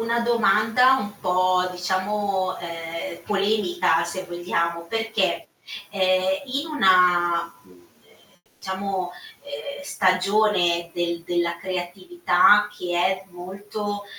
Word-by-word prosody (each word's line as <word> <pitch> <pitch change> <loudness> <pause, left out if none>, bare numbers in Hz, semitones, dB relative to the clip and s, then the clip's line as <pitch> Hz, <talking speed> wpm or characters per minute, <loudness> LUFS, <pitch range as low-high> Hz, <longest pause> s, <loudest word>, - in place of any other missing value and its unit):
una 230 +1 0
domanda 235 +2 +3
un 205 -5 -4
po' 185 0 +2
diciamo, 190 +1 -1
ehm, 165 0 -7
polemica 200 -5 +1
se 185 +2 -5
vogliamo, 170 -1 -2
perché, 225 +5 -1 0.4
ehm, 190 +1 +1
in 275 +4 -3
una, 180 - +3
mhmm, 90 -2 -22 0.8
diciamo, 190 -1 -3 0.3
uhm, 285 0 -8
stagione 185 -5 +1
del 170 -1 -2
della 170 -1 -1
creatività 190 - +2
che 175 -1 -3
è 185 +2 +1
molto 205 +3 -6
185 Hz, 95 wpm, -23 LUFS, 175-210 Hz, 0.8 s, domanda